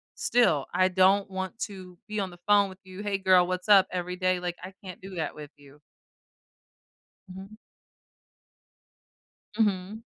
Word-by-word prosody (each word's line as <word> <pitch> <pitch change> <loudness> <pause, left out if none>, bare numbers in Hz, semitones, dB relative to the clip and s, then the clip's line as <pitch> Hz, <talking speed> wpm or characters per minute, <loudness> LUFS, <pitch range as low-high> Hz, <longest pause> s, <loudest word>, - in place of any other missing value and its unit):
still, 170 - +2
I 185 +1 +3
don't 190 +2 +3
want 190 +2 -5
to 185 -5 -7
be 215 0 -3
on 195 -2 -2
the 175 - -14
phone 205 -1 +5
with 190 0 -13
you, 185 +1 -10
"Hey, 205 -1 -1
girl, 185 -2 +4
what's 185 +2 -4
up?" 195 -2 +7
Every 180 0 -3
day, 185 -1 +1
like, 175 -1 -4
I 185 +1 -8
can't 185 -2 -9
do 190 0 -9
that 165 - -3
with 150 -1 -10
you. 145 0 -19 1.5
Mhm. 190 +3 -11 2.0
Mhm. 205 0 -1
185 Hz, 155 wpm, -27 LUFS, 180-200 Hz, 2.0 s, up